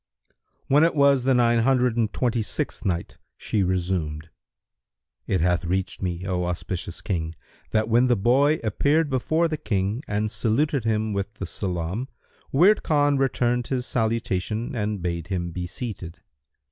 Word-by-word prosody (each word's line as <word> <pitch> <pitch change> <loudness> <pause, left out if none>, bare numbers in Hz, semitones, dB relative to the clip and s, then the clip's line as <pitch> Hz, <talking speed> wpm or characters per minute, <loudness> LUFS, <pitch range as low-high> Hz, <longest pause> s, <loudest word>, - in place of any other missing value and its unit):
When 145 +3 +5
it 165 - +3
was 140 -3 +4
the 135 -1 +4
Nine 120 -1 +4
Hundred 125 -1 +2
and 115 -3 +1
Twenty 120 -2 0
sixth 105 - -3
Night, 85 -3 -2 0.2
She 105 - -1
resumed: 85 -4 -1 1.0
It 95 -4 +1
hath 90 0 +2
reached 95 +2 -2
me, 90 -1 -3
O 90 -2 -1
auspicious 90 +1 -4
King, 80 -4 -3 0.3
that 110 0 +1
when 120 +3 +4
the 120 - +4
boy 135 +9 +3
appeared 145 +8 +1
before 155 +6 +1
the 155 -1 -3
King 100 0 -1
and 105 +1 -1
saluted 115 +4 0
him 110 -1 0
with 100 +2 -3
the 95 - -5
salam, 90 +6 -3 0.4
Wird 185 +9 +5
Khan 145 -2 +2
returned 125 -2 +1
his 125 -2 -1
salutation 115 -1 -1
and 105 -4 -2
bade 85 -2 -3
him 90 -3 -2
be 90 +1 -4
seated. 95 -6 -7
110 Hz, 155 wpm, -24 LUFS, 90-125 Hz, 1.0 s, When